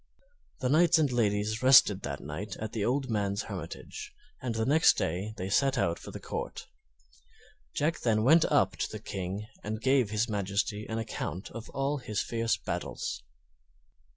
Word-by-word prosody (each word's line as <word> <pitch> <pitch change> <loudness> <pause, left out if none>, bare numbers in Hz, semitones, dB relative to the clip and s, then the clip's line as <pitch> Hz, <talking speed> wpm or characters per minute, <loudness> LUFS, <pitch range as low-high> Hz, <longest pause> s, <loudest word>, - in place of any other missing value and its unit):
The 125 - +1
knights 165 +4 +5
and 150 -4 +2
ladies 110 -2 +1
rested 125 -7 +7
that 70 0 -5
night 75 +9 -6
at 110 -1 -5
the 110 - -1
old 130 +4 0
man's 100 -1 0
hermitage, 90 -5 -7 0.3
and 120 -3 -3
next 155 +5 +5
day 95 +7 -2
they 95 - -3
set 135 +7 +2
out 85 -7 +1
for - - -10
the - - -7
Court. - - -5 1.1
Jack 155 +3 0
then 110 -2 +2
went 160 +6 +6
up - - +2
to - - -2
the - - -5
King 95 +2 -4 0.2
and 110 +1 -3
gave 130 -2 +3
his 105 +2 0
Majesty 105 +1 -1
an 110 - -2
account 105 -4 -4
of 115 +1 -8
all 140 +1 -1
his 105 -5 -3
fierce 115 -1 0
battles. - - -4
110 Hz, 165 wpm, -30 LUFS, 100-130 Hz, 1.1 s, rested